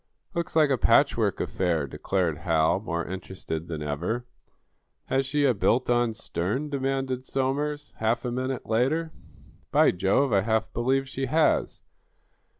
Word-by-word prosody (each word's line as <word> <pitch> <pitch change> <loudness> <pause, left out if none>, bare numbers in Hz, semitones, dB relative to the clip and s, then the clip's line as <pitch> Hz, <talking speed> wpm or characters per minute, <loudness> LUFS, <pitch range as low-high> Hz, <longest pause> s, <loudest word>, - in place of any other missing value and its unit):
"Looks 170 -2 -3
like 155 -3 +4
a 130 - +2
patchwork - - +3
affair," 85 -5 0
declared 85 +2 -1
Hal, 80 +2 +2
more 85 -5 -3
interested 90 -3 -6
than 80 -3 -4
ever. 85 +12 -2 0.8
"Has 135 0 +1
she 145 +1 +1
a 130 - +4
built 120 +4 +1
on 120 -2 +2
stern?" 110 - -3
demanded 135 -2 -1
Somers, 145 +3 -2
half 115 +3 0
a 120 - -1
minute 130 +1 -3
later. 135 +9 +1 0.6
"By - - +5
Jove, 100 +8 +1
I 100 - +4
half 110 +1 0
believe 135 +3 +1
she 135 0 -3
has. 155 +4 +1
120 Hz, 145 wpm, -26 LUFS, 95-135 Hz, 0.8 s, By